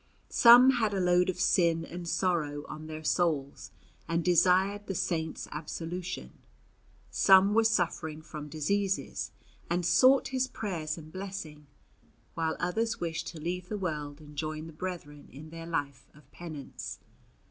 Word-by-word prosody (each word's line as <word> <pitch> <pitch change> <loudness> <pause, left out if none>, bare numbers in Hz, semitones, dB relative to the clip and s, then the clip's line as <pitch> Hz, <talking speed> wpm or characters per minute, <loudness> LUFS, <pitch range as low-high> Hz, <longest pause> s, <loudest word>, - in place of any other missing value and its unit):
Some 245 +2 +8
had 220 -5 0
a - - 0
load 180 0 +3
of 180 - -3
sin 170 -2 +2
and 175 0 -7
sorrow 155 -6 0
on 155 0 -8
their 155 0 -7
souls, 155 -5 0 0.4
and 165 0 -1
desired 190 +3 +3
the 195 - -3
Saint's 160 -2 -2
absolution; 170 +4 -6 0.7
some 195 +1 +6
were 225 +1 +4
suffering 165 -7 0
from 150 -1 -8
diseases, 195 +6 -1 0.4
and 175 +1 0
sought 255 +10 +5
his 260 -1 0
prayers 170 -10 -4
and 155 -1 -11
blessing; 185 -6 -7 0.7
while 160 -1 -1
others 225 +6 -1
wished 165 -2 -3
to 165 - -7
leave 180 +3 -4
the 210 - -2
world 150 -6 -4
and 150 -1 -14
join 155 +1 -4
the 165 - -10
brethren 155 -4 -7
in 155 +4 -11
their 165 0 -8
life 140 -5 -3
of 150 -2 -20
penance. 155 -5 -8
170 Hz, 145 wpm, -30 LUFS, 155-190 Hz, 0.7 s, Some